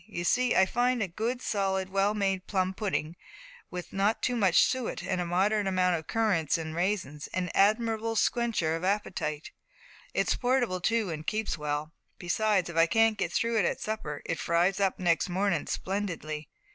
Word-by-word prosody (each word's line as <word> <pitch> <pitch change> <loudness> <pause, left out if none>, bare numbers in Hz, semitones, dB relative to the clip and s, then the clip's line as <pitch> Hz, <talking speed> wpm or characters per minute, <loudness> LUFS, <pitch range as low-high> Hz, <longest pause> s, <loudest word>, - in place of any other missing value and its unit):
You 175 -5 -5
see 250 +7 +2
I 190 - +6
find 245 +2 +1
a - - -2
good, 230 +8 -3
solid, 190 -2 -1
well 195 +2 +1
made 195 -2 -1
plum 185 -1 0
pudding, 185 -6 -2 0.5
with 180 -1 -7
not 200 +3 +1
too 245 - +1
much 195 -7 +4
suet, 260 -3 -1
and 185 -2 -1
a 175 - -3
moderate 200 +4 +1
allowance 180 -2 +2
of 160 - -13
currants 200 -10 +1
and 160 -1 -5
raisins, 175 -5 -2
an 180 -1 -1
admirable 225 +2 +2
squencher 220 -9 +1
of 165 - -5
appetite. 180 -6 -2 0.6
It's - - +2
portable 245 -7 0
too, 225 -2 +1
and 155 0 -6
keeps 215 0 -1
well. 150 +1 -3 0.2
Besides, 195 +1 +1
if 170 -1 -6
I 165 0 +6
can't 225 +2 +3
get 175 -3 -1
through 230 +4 0
with 205 - +3
it - - +3
at - - -4
supper, 150 -10 -4
it 165 - -2
fries 170 +7 +1
up 195 -2 +1
next 175 0 +1
mornin' 185 -3 0
splendidly. 170 -6 -3
190 Hz, 185 wpm, -29 LUFS, 170-215 Hz, 0.6 s, I